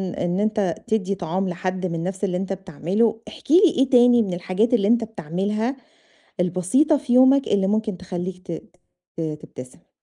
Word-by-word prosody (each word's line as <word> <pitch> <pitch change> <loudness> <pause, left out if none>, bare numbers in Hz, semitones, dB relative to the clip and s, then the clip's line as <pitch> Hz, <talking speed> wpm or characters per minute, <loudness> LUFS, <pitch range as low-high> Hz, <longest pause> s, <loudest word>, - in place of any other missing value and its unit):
إن 175 +2 -1
أنت 210 -5 0
تدّي 200 -3 0
طعام 185 +1 -2
لحد 185 +1 -3
من 165 -2 -3
نفْس 190 +2 -5
اللي 180 -2 0
أنت 195 +1 -3
بتعمله، 195 +5 -1
احكِ - - -9
لي 355 +4 +7 0.2
إيه 265 0 +2
تاني 245 -1 +6
من 190 -4 -2
الحاجات 185 +7 0
اللي 200 -4 +3
أنت 235 0 +3
بتعملها 210 - -3 0.7
البسيطة 185 - +2
في 275 -3 -4
يومك، 260 +2 +5
اللي 195 -1 +2
ممكن 215 -1 -1
تخلّيك 185 0 -6
ت 170 - -5 0.6
ت - - -5
تبتسم؟ 150 -5 -8
195 Hz, 170 wpm, -22 LUFS, 180-230 Hz, 0.7 s, لي